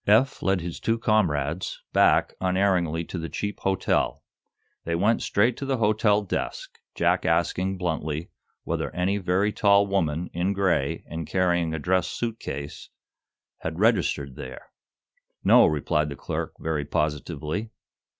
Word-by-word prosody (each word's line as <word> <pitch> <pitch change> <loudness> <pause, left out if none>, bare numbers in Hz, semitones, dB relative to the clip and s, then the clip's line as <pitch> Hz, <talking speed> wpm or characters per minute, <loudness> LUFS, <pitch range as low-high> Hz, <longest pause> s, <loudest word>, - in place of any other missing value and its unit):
Eph 115 +6 +4
led 95 -2 +1
his 85 0 -5
two 115 0 0
comrades 90 - 0
back - - +4
unerringly 90 -3 +1
to 90 - -5
the 80 0 -5
cheap 105 0 -4
hotel. 95 -1 0 0.6
They 85 - -1
went 105 +7 +2
straight 115 +4 +2
to 140 - -4
the 135 -1 +1
hotel 105 -1 +3
desk, 100 - -4 0.2
Jack - - +2
asking, 95 +1 +1
bluntly, 80 -2 -3 0.3
whether - - -2
any 95 +3 +1
very 95 +3 +1
tall 100 -1 +4
woman, 90 -4 -1
in 90 +3 0
gray, 90 -8 0
and 80 -1 -5
carrying 85 -3 +1
a - - -2
dress 90 +3 +1
suit 115 -1 -4
ease, 70 0 -6 0.7
had 80 0 -4
registered 90 - +1
there. 65 0 -9 0.7
"No," - - +7
replied 75 0 0
the 70 - -6
clerk, - - -4
very 80 -2 -1
positively. 75 +7 -2
90 Hz, 140 wpm, -25 LUFS, 80-100 Hz, 0.7 s, No